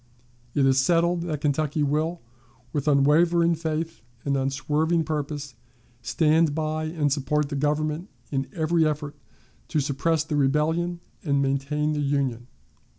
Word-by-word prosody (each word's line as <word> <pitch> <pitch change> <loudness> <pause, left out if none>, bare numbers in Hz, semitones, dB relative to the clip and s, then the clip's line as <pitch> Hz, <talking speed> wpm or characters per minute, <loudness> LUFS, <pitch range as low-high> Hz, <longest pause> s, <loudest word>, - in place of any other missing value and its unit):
It 140 - +3
is 135 0 +4
settled 170 +4 +2
that 155 -4 -3
Kentucky 150 +1 0
will, 155 +4 0 0.5
with 145 0 -2
unwavering 165 +4 +4
faith 165 0 -3 0.2
and 140 -1 +1
unswerving 150 +5 +1
purpose, 145 -2 -4 0.5
stand 155 0 +2
by 155 0 -1
and 155 -3 0
support 150 +1 0
the 145 - -3
Government 150 +4 -1 0.2
in 135 -1 -1
every 165 0 +1
effort 150 -1 -1 0.5
to 155 - 0
suppress 145 +3 0
the 155 -1 -3
rebellion 160 +5 +1 0.2
and 140 -3 +1
maintain 140 +2 0
the 150 - -1
Union." 135 -4 -1
150 Hz, 135 wpm, -25 LUFS, 140-160 Hz, 0.5 s, is